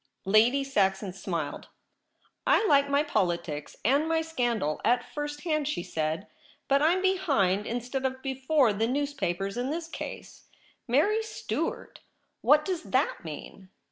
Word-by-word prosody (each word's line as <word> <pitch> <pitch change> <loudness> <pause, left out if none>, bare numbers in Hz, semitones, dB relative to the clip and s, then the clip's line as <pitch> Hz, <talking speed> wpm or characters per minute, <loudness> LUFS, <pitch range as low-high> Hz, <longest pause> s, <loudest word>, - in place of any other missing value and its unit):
' - - -42
Lady 250 +5 +3
Saxon 195 -7 0
smiled. 170 -6 -4 0.4
' - - -20
I - - 0
like 280 -6 +4
my 280 +1 +3
politics 170 - -2
and 280 +6 +3
my 325 0 +2
scandal 240 - -1
at 245 +1 +2
first 295 0 -4
hand,' 305 -4 0
she 235 -13 -2
said. 160 +4 -2 0.2
* - - -29
But 275 +1 +3
I'm 350 +5 +3
behind 240 - +2
instead 245 +3 -3
of 260 0 -7
before 265 -2 +2
the 220 +3 0
newspapers 240 -8 -2
in 250 +2 -1
this 325 +2 -3
case. - - -8 0.4
Mary 360 - +3
Stuart! 440 - -4 0.4
what 300 +1 +5
does 365 -3 -2
that 260 +3 0
mean 170 +4 -9
260 Hz, 150 wpm, -28 LUFS, 195-295 Hz, 0.4 s, what